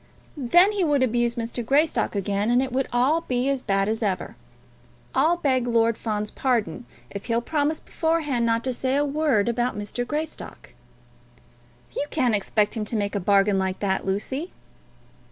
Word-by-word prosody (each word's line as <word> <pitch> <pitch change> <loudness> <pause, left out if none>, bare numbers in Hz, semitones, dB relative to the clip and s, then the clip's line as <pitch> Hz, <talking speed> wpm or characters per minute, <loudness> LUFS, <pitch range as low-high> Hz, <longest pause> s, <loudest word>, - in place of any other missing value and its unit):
"Then 345 - +4
he 405 -3 0
would 290 -5 +2
abuse 240 -1 +1
Mr. 235 0 -4
Greystock 285 +1 +1
again, 200 +2 -1
and 245 +1 +4
it 265 - -4
would 265 +1 0
all 260 +7 +2
be 250 -4 -1
as 275 -2 0
bad 195 -3 +1
as 220 +1 -1
ever. 195 -4 -2 0.8
I'll 315 +6 +3
beg 260 -7 +1
Lord 230 -1 +2
Fawn's 210 -2 -3
pardon 245 -2 -1 0.2
if 200 - -7
he'll 230 -1 +1
promise 300 +4 -1
beforehand 315 -7 -1
not 230 0 +1
to 260 - -1
say 260 +2 -1
a 290 +1 +2
word 280 -8 +1
about 240 -1 0
Mr. 210 +4 -3
Greystock." 305 +2 -6 1.2
"You 290 - -2
can't 255 -7 +1
expect 210 +1 +1
him 220 - -2
to 225 - -4
make 205 -2 -1
a 205 - 0
bargain 200 +1 +3
like 190 0 -1
that, 190 -2 0
Lucy." 260 - -3
240 Hz, 170 wpm, -24 LUFS, 210-280 Hz, 1.2 s, Then